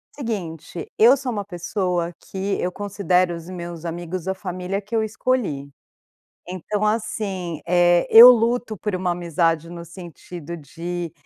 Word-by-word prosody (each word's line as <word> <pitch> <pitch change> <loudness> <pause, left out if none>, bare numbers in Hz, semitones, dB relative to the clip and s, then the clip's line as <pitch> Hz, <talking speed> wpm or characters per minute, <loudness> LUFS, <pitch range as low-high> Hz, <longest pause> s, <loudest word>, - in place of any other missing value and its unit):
seguinte, 180 - -5
eu 235 +5 +7
sou 265 -2 -4
uma 205 -3 -3
pessoa 175 -1 -2
que 195 +1 -3
eu 180 - -1
considero 185 -3 0
os 165 0 -10
meus 175 -2 -7
amigos 175 +1 -5
a 190 - +1
família 185 +1 -4
que 210 +3 -6
eu 220 - +2
escolhi. 215 - -1 0.8
Então 185 +4 -3
assim, 205 -6 -2
eh, 175 0 +4
eu 235 +2 +11
luto 235 -2 +2
por 210 +1 -3
uma 180 -1 -1
amizade 170 -1 0
no 170 -1 -8
sentido 170 -1 -9
de 170 +3 -6
180 Hz, 145 wpm, -22 LUFS, 170-210 Hz, 0.8 s, eu